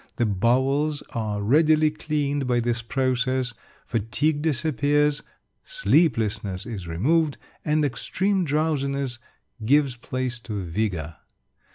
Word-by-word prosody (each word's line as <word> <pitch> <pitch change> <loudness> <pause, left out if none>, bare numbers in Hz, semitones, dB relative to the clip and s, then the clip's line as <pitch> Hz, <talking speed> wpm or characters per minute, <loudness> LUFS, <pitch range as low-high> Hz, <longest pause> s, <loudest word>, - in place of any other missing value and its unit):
The 120 - +1
bowels 130 +8 +1
are 105 -3 -2
readily 155 +5 +4
cleaned 145 -3 -2
by 120 -1 +2
this 120 0 0
process; 130 0 0 0.3
fatigue 145 +8 0
disappears; 150 -1 +1 0.4
sleeplessness 110 - +1
is 100 -7 -6
removed, 145 - +1 0.3
and 150 0 +2
extreme 190 +8 0
drowsiness 140 -4 -1 0.4
gives 140 +2 +3
place 125 0 -3
to 105 -4 -5
vigour. 85 -4 -2
130 Hz, 100 wpm, -24 LUFS, 115-150 Hz, 0.4 s, readily